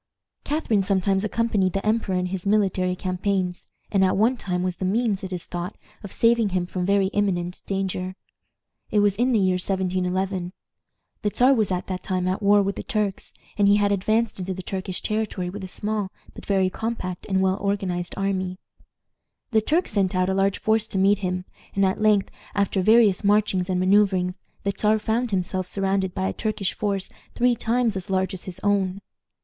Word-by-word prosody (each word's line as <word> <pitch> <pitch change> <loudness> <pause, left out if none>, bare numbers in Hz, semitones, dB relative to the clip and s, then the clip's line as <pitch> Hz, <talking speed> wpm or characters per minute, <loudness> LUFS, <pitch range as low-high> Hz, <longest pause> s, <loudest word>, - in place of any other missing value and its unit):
Catharine 285 -9 +1
sometimes 195 0 +1
accompanied 215 -4 +1
the 195 - -2
emperor 215 -3 +1
in 180 0 0
his 180 +1 -4
military 190 -3 +2
campaigns, 185 0 -2 0.2
and 195 -2 +3
at 185 0 +2
one 225 +5 +3
time 180 -6 -2
was 185 -1 -2
the - - -5
means, 205 +1 0
it 190 - -5
is 180 -2 -3
thought, 175 +2 -5 0.3
of 200 - -7
saving 230 -2 +3
him 185 -1 0
from 180 0 -3
very 200 -1 +3
imminent 185 -4 -1
danger. 185 -1 -2 0.7
It 210 - +3
was 205 -1 +3
in 245 +5 +2
the 235 - +3
year 185 -2 +2
1711. 185 0 -1 0.7
The 210 - +1
Czar 250 +6 +4
was 215 -6 +1
at 180 0 -1
that 185 -1 -4
time 185 -2 -1
at 185 +2 -1
war 205 0 +5
with 200 +1 -2
the - - -3
Turks, 210 -3 -2 0.3
and 200 - +5
he 200 - +6
had 205 -1 +2
advanced 215 +2 +1
into 185 0 -3
the 185 - -7
Turkish 185 0 -4
territory 215 -4 -2
with 200 +1 -7
a - - -4
small, 210 0 -2 0.2
but - - -12
very 190 -2 +2
compact 200 -5 -4
and 190 -1 +2
well 190 0 +2
organized 190 -3 -2
army. 190 -2 -1 0.9
The 220 -2 +4
Turks 320 +10 +1
sent 195 -3 +1
out 185 0 +2
a - - +1
large 195 0 +2
force 220 0 +1
to 200 - -2
meet 195 +1 +4
him, 180 -1 -2 0.3
and 195 0 +3
at 190 +2 0
length, 210 -2 +3 0.2
after 200 -1 +1
various 215 -1 +5
marchings 200 -3 +2
and 180 -1 +1
manoeuvrings, 185 -1 +2 0.2
the 200 - 0
Czar 215 0 +2
found 230 +3 -1
himself 185 -1 -1
surrounded 195 -1 0
by 190 -1 0
a - - -2
Turkish 210 -3 -2
force 200 -2 -2 0.3
three 245 0 +3
times 235 -1 0
as 190 -1 -5
large 190 0 0
as 185 - -7
his 185 -1 -6
own. 200 -1 +1
195 Hz, 195 wpm, -24 LUFS, 185-210 Hz, 0.9 s, he